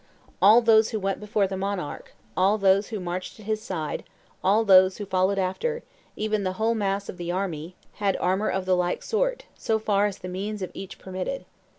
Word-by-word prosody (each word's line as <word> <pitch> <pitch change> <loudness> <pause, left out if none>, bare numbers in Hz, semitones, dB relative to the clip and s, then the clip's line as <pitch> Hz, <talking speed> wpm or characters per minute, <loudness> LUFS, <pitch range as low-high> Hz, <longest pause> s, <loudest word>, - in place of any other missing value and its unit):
All 215 +5 +8
those 220 -1 +5
who 220 - -2
went 195 -1 -1
before 210 -1 +1
the 190 0 -3
monarch, 190 -5 -4 0.2
all 195 +3 +3
those 195 0 +3
who 215 - -4
marched 180 +3 -5
at 215 - -12
his 215 0 -1
side, 160 -8 -4 0.4
all 205 +4 +4
those 185 -1 +6
who 205 - -5
followed 190 +1 +1
after, 465 - -1 0.3
even 215 -1 -1
the 185 -1 -1
whole 220 +4 +1
mass 200 -2 -1
of - - -7
the 175 -1 -3
army, 175 -2 -3 0.2
had 200 -2 +1
armor 190 +4 +1
of 190 -1 -1
the 185 0 +3
like 180 0 -1
sort, - - -1
so 220 - 0
far 210 -1 +2
as 200 - -5
the 185 - -8
means 200 +3 -4
of 185 - -5
each 195 - -8
permitted. 190 +8 -5
195 Hz, 205 wpm, -25 LUFS, 185-215 Hz, 0.4 s, All